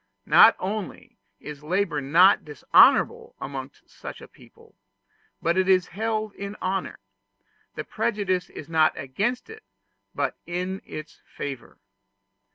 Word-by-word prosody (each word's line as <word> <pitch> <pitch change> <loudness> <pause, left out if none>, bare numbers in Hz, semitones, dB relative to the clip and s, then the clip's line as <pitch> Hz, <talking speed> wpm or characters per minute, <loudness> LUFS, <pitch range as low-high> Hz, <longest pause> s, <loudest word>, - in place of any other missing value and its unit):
Not - - +7
only 200 +2 -6 0.2
is 150 -1 -9
labor 170 -1 -1
not 170 +8 +5
dishonorable 150 -3 +3
amongst 135 0 -8
such - - -10
a - - -12
people, - - -20 0.7
but 170 +3 +2
it 190 0 +1
is 185 -1 +3
held 215 0 -2
in 200 +1 -7
honor: 190 +1 -3 0.8
the - - -4
prejudice 190 -5 -2
is 145 - -10
not 160 -2 +2
against 205 - -2
it, 445 0 -12 0.5
but - - -2
in 180 +2 -3
its 155 0 -9
favor. 135 -3 -7
185 Hz, 125 wpm, -25 LUFS, 150-200 Hz, 0.8 s, Not